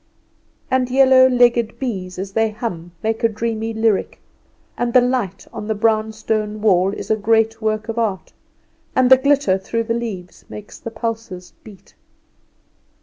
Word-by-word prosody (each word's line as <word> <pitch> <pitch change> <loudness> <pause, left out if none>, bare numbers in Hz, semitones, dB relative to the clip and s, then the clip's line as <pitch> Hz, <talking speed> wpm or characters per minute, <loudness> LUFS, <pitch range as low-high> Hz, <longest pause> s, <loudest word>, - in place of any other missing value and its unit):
And 255 -1 +1
yellow 260 0 +6
legged 240 -2 +2
bees 190 -8 -4
as 190 +1 -5
they 225 +2 +1
hum 180 -6 -6
make 225 +1 -2
a 230 - +4
dreamy 225 0 -3
lyric; 220 -2 0 0.6
and 240 -1 -2
the 255 - +7
light 245 -7 -1
on 210 - -6
the 220 - -1
brown 220 +1 +1
stone 215 -1 -3
wall 195 -3 +3
is 210 - -6
a - - +4
great 225 +1 +1
work 215 0 -1
of 225 0 -3
art; 205 -5 -2 0.6
and 255 0 +3
the 260 - +10
glitter 280 -7 +2
through 230 +4 -2
the 230 - -2
leaves 215 -7 -6
makes 210 -1 -10
the - - -6
pulses 225 -5 -6
beat. 205 -4 -16
225 Hz, 160 wpm, -19 LUFS, 210-235 Hz, 0.6 s, the